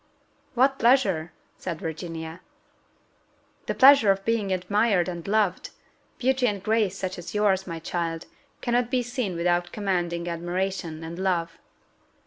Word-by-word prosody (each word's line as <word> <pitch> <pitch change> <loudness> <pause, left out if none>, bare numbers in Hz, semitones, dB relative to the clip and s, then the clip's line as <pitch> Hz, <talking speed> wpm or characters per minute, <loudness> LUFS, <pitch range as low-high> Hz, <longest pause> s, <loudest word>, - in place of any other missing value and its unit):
"What 270 +2 +3
pleasure?" 200 -10 +3 0.3
said 170 -4 -4
Virginia. 165 0 -6 1.3
"The - - -1
pleasure 270 -5 +7
of 195 0 +2
being 225 -4 0
admired 190 0 +1
and 175 -1 -6
loved: 205 -3 +1 0.5
beauty 260 0 +2
and 200 -3 -2
grace 215 -2 +1
such 185 -2 -4
as 175 - -8
yours, 195 -2 +2
my 165 -2 -4
child, 165 0 -3 0.4
cannot 240 -1 +1
be 250 -1 +1
seen 245 -6 -3
without 175 +1 0
commanding 175 -4 -2
admiration 175 -1 -3
and 165 +2 -7
love." 170 -3 -1
190 Hz, 130 wpm, -25 LUFS, 170-220 Hz, 1.3 s, pleasure